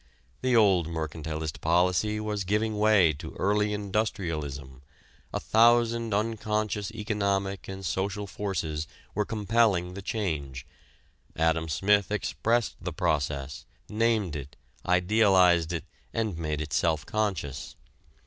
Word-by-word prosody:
The 130 -1 +2
old 95 -7 +4
mercantilist 80 -1 -4
policy 90 +6 +2
was 105 -2 -2
giving 105 +2 0
way 105 -7 +5
to 80 +2 -9
early 105 +1 +1
industrialism: 85 - -3 0.5
a - - -2
thousand 115 +5 +3
unconscious 105 -1 -1
economic 100 -3 -2
and 95 0 -6
social 100 +3 -2
forces 85 -6 -3 0.3
were 105 +1 0
compelling 105 -4 +1
the 100 - -7
change. 75 - -3 0.7
Adam 80 0 +1
Smith 100 +6 +2
expressed 115 +2 0
the - - -3
process, 70 -2 -2 0.2
named 110 -6 +1
it, 70 -1 -7 0.3
idealized 90 -2 +4
it 85 - -3 0.3
and 110 -5 -1
made 75 -2 -3
it 75 -1 -5
self 80 -2 +1
conscious. 95 -10 -2
95 Hz, 115 wpm, -28 LUFS, 80-105 Hz, 0.7 s, way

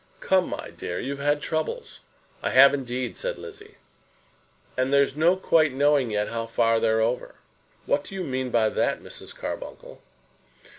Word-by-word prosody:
"Come, 185 -1 +2
my - - -6
dear; 90 - -5
you've 140 +1 -4
had 145 +1 +1
troubles." 160 -1 -3 0.4
"I - - -1
have, 135 +2 +7
indeed," 130 -2 -3
said - - -3
Lizzie. 425 -1 -11 1.0
"And 130 +1 0
there's 140 -1 +3
no 165 +4 +4
quite 155 -6 +3
knowing 140 -2 +3
yet 105 -1 -1
how 115 0 -3
far 115 0 +2
they're 110 0 +2
over." 120 +3 -1 0.5
"What 145 0 0
do 195 - -9
you 190 - -3
mean 130 -3 -2
by 115 -2 +3
that, - - 0
Mrs. - - -10
Carbuncle?" - - -7
140 Hz, 160 wpm, -25 LUFS, 120-155 Hz, 1.0 s, have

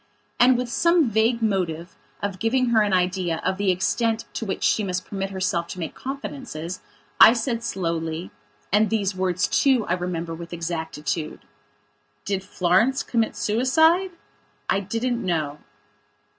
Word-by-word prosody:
And 245 +1 +6
with 250 0 -2
some 335 +1 +3
vague 225 +2 +2
motive 175 -5 -1 0.3
of 200 -2 -3
giving 250 +2 +1
her 225 -2 +4
an 205 -1 +1
idea 180 -2 +1
of 190 - 0
the 200 -1 +1
extent 225 +5 0
to 225 - -4
which 190 - -3
she 215 - +2
must 185 -1 -3
permit 195 -1 -4
herself 185 -3 -1
to 185 - -7
make 165 - -4
confidences, 255 - -6 0.4
I 225 - +10
said 230 0 -1
slowlyand 165 -6 -3 0.6
these 205 -3 0
words 185 -1 0
too 260 -5 +3
I 175 - 0
remember 175 -2 -3
with 170 +1 -8
exactitude 160 -2 -4 0.8
"Did 195 -2 -2
Florence 195 +8 +2
commit 230 -2 0
suicide? 320 - +3 0.6
I - - +2
didn't 230 +5 -2
know." 155 -5 -1
195 Hz, 145 wpm, -24 LUFS, 175-235 Hz, 0.8 s, I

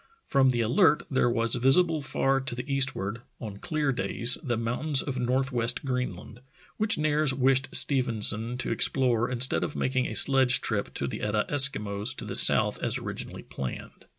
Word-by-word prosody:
From 135 -2 +2
the 120 -2 -1
Alert 125 +6 +2
there 130 -2 +1
was 115 -1 0
visible 155 +5 +2
far 135 -1 -1
to 130 -2 -4
the 125 +2 -7
eastward, 135 -6 -1 0.2
on 105 -4 -8
clear 155 - -2
days, 125 -1 +3
the 120 -8 -3
mountains 130 +5 0
of 130 -3 -5
north 130 +2 -1
west 120 +2 0
Greenland, 125 -4 -5 0.4
which 215 +1 +1
Nares 150 -2 +1
wished 135 0 +1
Stephenson 115 -3 +1
to 130 - -4
explore 120 -3 +1
instead 125 +1 +1
of - - -5
making 130 -1 -2
a - - -7
sledge 135 -2 +3
trip 105 -3 -3
to - - -3
the 70 - -6
Etah 105 0 -1
Eskimos 110 -5 +2
to - - -6
the - - -7
south - - +3
as - - -1
originally - - -8
planned. 65 -2 -9
125 Hz, 175 wpm, -26 LUFS, 115-135 Hz, 0.4 s, days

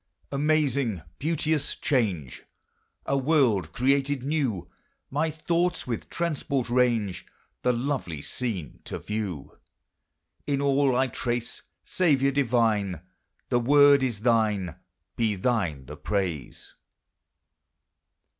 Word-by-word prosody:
Amazing, 140 - +1 0.2
beauteous 155 -1 0
change! 95 - -1 0.6
A 140 - 0
world 125 - +2
created 135 +3 +1
new! 135 - -1 0.4
My 150 +4 +1
thoughts 170 +2 0
with 115 -3 -4
transport 140 -7 -1
range, 120 -7 +1 0.3
The 125 - +3
lovely 120 - -2
scene 105 - -4
to - - -4
view; 105 -9 -5 0.9
In 140 -2 +1
all 140 -2 +3
I 130 +1 +3
trace, 120 -1 -3 0.2
Saviour 140 -7 +2
divine, 115 - +1 0.5
The 120 - +3
word 145 +2 +6
is 120 -6 -1
thine, 110 -7 +2 0.4
Be 110 -3 +1
thine 95 - -1
the - - -9
praise! 90 -10 -3
125 Hz, 100 wpm, -26 LUFS, 105-140 Hz, 0.9 s, word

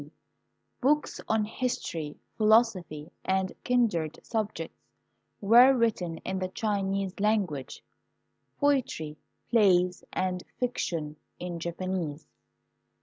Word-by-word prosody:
d. - - -12 0.7
Books 295 +3 +1
on 220 -1 +2
history, 210 - -3 0.2
philosophy, 210 -9 +2
and 190 0 0
kindred 210 -11 +1
subjects 215 -7 -3 0.6
were 240 +6 +7
written 205 -9 0
in 190 0 -2
the 185 - -1
Chinese 195 -1 -2
language; 195 -10 0 0.8
poetry, 260 - +1 0.4
plays, 180 -6 +4
and 180 -1 -1 0.2
fiction 165 -11 -2 0.2
in 175 -1 -5
Japanese. 170 -3 -3
190 Hz, 90 wpm, -28 LUFS, 170-225 Hz, 0.8 s, were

